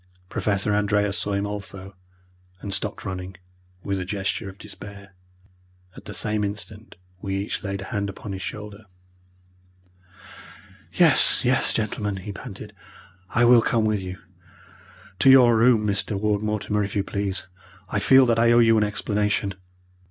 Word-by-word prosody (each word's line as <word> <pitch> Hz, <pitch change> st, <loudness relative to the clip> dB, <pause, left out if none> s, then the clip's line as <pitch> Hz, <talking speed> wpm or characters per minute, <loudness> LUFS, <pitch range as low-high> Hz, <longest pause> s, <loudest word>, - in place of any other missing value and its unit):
Professor 100 Hz, 0 st, 0 dB
Andreas 105 Hz, -1 st, +1 dB
saw 100 Hz, -, -2 dB
him 100 Hz, +1 st, -1 dB
also, 100 Hz, -2 st, -7 dB, 0.6 s
and 100 Hz, 0 st, -4 dB
stopped 100 Hz, +2 st, 0 dB
running, 95 Hz, -1 st, -6 dB, 0.5 s
with 100 Hz, -1 st, -2 dB
a -, -, -3 dB
gesture 95 Hz, 0 st, -3 dB
of 95 Hz, -, -13 dB
despair. 100 Hz, -1 st, -10 dB, 0.8 s
At -, -, -13 dB
the 105 Hz, -, -7 dB
same 105 Hz, -1 st, -1 dB
instant 105 Hz, +1 st, -5 dB, 0.3 s
we 95 Hz, -1 st, -3 dB
each 100 Hz, +2 st, -3 dB
laid 100 Hz, -1 st, -4 dB
a -, -, -9 dB
hand 100 Hz, -1 st, -1 dB
upon 100 Hz, +1 st, -8 dB
his 95 Hz, -1 st, -5 dB
shoulder. 105 Hz, +1 st, -7 dB, 2.1 s
"Yes, -, -, +4 dB
yes, -, -, +3 dB
gentlemen," 105 Hz, -2 st, -2 dB
he 95 Hz, +2 st, -7 dB
panted, 100 Hz, -, -9 dB, 0.6 s
"I 120 Hz, +2 st, +3 dB
will 120 Hz, -1 st, +7 dB
come 115 Hz, -1 st, +1 dB
with 105 Hz, -2 st, 0 dB
you. 90 Hz, 0 st, -6 dB, 1.0 s
To 135 Hz, -, +5 dB
your 125 Hz, -3 st, +7 dB
room, 115 Hz, -1 st, +4 dB
Mr. 100 Hz, 0 st, -1 dB
Ward 105 Hz, -1 st, 0 dB
Mortimer, 105 Hz, -1 st, -1 dB
if 100 Hz, +1 st, -5 dB
you 100 Hz, -, +1 dB
please! 100 Hz, -1 st, -3 dB, 0.4 s
I 105 Hz, -, -1 dB
feel 130 Hz, +4 st, +6 dB
that 115 Hz, -2 st, +2 dB
I 115 Hz, 0 st, +4 dB
owe 120 Hz, -, +5 dB
you 115 Hz, -2 st, +5 dB
an -, -, +2 dB
explanation." 105 Hz, -1 st, -1 dB
105 Hz, 155 wpm, -24 LUFS, 100-110 Hz, 2.1 s, will